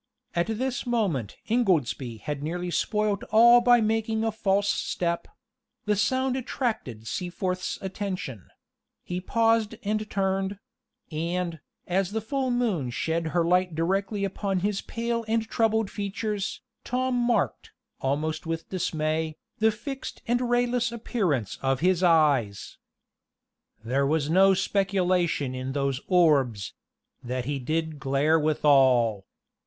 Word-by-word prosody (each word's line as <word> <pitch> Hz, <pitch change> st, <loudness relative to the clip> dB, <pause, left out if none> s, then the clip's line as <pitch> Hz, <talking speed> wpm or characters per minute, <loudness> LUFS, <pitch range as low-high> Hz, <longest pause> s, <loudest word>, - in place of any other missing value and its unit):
At 170 Hz, +2 st, +1 dB
this 245 Hz, +3 st, -2 dB
moment 190 Hz, -, -1 dB
Ingoldsby 145 Hz, -, 0 dB
had 145 Hz, -2 st, -3 dB
nearly 175 Hz, +3 st, -3 dB
spoiled 210 Hz, +1 st, 0 dB
all 235 Hz, +2 st, +7 dB
by 240 Hz, -1 st, +5 dB
making 220 Hz, 0 st, 0 dB
a 225 Hz, -, +1 dB
false 200 Hz, -1 st, +1 dB
step: 170 Hz, -3 st, -1 dB, 0.6 s
the 210 Hz, -1 st, +2 dB
sound 260 Hz, +5 st, +1 dB
attracted 225 Hz, -, -3 dB
Seaforth's 180 Hz, -, -3 dB
attention 185 Hz, -, -5 dB, 0.6 s
he 180 Hz, +1 st, -4 dB
paused 225 Hz, +1 st, +2 dB
and 215 Hz, +1 st, -1 dB
turned; 195 Hz, 0 st, -1 dB, 0.5 s
and, 170 Hz, +1 st, -2 dB, 0.3 s
as 190 Hz, +2 st, 0 dB
the 220 Hz, -, 0 dB
full 260 Hz, +4 st, -2 dB
moon 220 Hz, -, 0 dB
shed 160 Hz, +8 st, -1 dB
her 170 Hz, +1 st, +1 dB
light 180 Hz, -1 st, +2 dB
directly 195 Hz, +5 st, 0 dB
upon 195 Hz, -1 st, -2 dB
his 205 Hz, 0 st, 0 dB
pale 230 Hz, 0 st, -2 dB
and 225 Hz, 0 st, 0 dB
troubled 220 Hz, -2 st, +1 dB
features, 205 Hz, 0 st, -3 dB, 0.2 s
Tom 255 Hz, +1 st, -1 dB
marked, 240 Hz, -1 st, 0 dB, 0.3 s
almost 155 Hz, +5 st, -2 dB
with 165 Hz, 0 st, -4 dB
dismay, 155 Hz, -3 st, -1 dB, 0.2 s
the 220 Hz, +1 st, +5 dB
fixed 265 Hz, +5 st, -6 dB
and 245 Hz, +1 st, +1 dB
rayless 245 Hz, -1 st, +1 dB
appearance 190 Hz, -, -1 dB
of 135 Hz, -1 st, 0 dB
his 180 Hz, 0 st, +3 dB
eyes: 145 Hz, -, +2 dB, 1.0 s
There 135 Hz, +4 st, +1 dB
was 155 Hz, 0 st, 0 dB
no 190 Hz, +2 st, +6 dB
speculation 185 Hz, -7 st, +1 dB
in 130 Hz, +1 st, -4 dB
those 140 Hz, -1 st, -1 dB
orbs 140 Hz, -, +3 dB, 0.5 s
That 125 Hz, 0 st, -3 dB
he 140 Hz, +1 st, -2 dB
did 155 Hz, +3 st, -2 dB
glare 140 Hz, +4 st, +2 dB
withal. 130 Hz, -9 st, +3 dB
185 Hz, 125 wpm, -26 LUFS, 155-220 Hz, 1.0 s, all